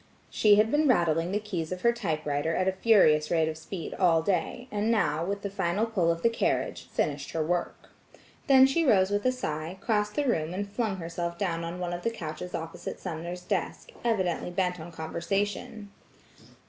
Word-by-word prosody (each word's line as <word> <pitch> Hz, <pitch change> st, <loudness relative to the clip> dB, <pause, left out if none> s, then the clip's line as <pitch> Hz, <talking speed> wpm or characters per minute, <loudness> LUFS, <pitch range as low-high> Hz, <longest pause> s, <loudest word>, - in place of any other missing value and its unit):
She 210 Hz, -1 st, +5 dB
had 215 Hz, +2 st, +3 dB
been 300 Hz, +1 st, +3 dB
rattling 170 Hz, -, +2 dB
the 205 Hz, -, +1 dB
keys 185 Hz, -6 st, -4 dB
of 185 Hz, 0 st, -4 dB
her 235 Hz, 0 st, +4 dB
typewriter 155 Hz, -7 st, -1 dB
at 185 Hz, -, +1 dB
a -, -, +4 dB
furious 185 Hz, -7 st, +4 dB
rate 160 Hz, -2 st, +2 dB
of 160 Hz, -, -3 dB
speed 160 Hz, +1 st, -7 dB
all 165 Hz, -3 st, +3 dB
day, 195 Hz, +7 st, -1 dB
and 210 Hz, +1 st, 0 dB
now, 165 Hz, -9 st, +1 dB
with 200 Hz, +3 st, -3 dB
a -, -, -1 dB
final 195 Hz, +2 st, 0 dB
pull 190 Hz, -7 st, +1 dB
of 165 Hz, 0 st, -4 dB
the 230 Hz, -, +5 dB
carriage, 230 Hz, -, -1 dB
finished 145 Hz, -1 st, -2 dB
her 160 Hz, -1 st, 0 dB
work. 175 Hz, +1 st, -3 dB, 0.6 s
Then 265 Hz, -1 st, +8 dB
she 275 Hz, +5 st, +2 dB
rose 200 Hz, -8 st, +4 dB
with 205 Hz, +4 st, +1 dB
a -, -, +4 dB
sigh, 160 Hz, -7 st, -4 dB
crossed 210 Hz, -1 st, 0 dB
the 295 Hz, -, +1 dB
room 170 Hz, -, 0 dB
and 200 Hz, +1 st, -3 dB
flung 210 Hz, 0 st, -2 dB
herself 170 Hz, 0 st, -4 dB
down 170 Hz, -3 st, -1 dB
on 170 Hz, +1 st, -5 dB
one 175 Hz, -1 st, -3 dB
of 175 Hz, -, -4 dB
the 230 Hz, -, 0 dB
couches 180 Hz, -5 st, -6 dB
opposite 165 Hz, 0 st, -6 dB
Sumner's 175 Hz, 0 st, -5 dB
desk, -, -, -3 dB
evidently 190 Hz, -8 st, 0 dB
bent 180 Hz, 0 st, -1 dB
on 165 Hz, +2 st, -8 dB
conversation. 200 Hz, +6 st, -3 dB
180 Hz, 195 wpm, -28 LUFS, 165-210 Hz, 0.6 s, Then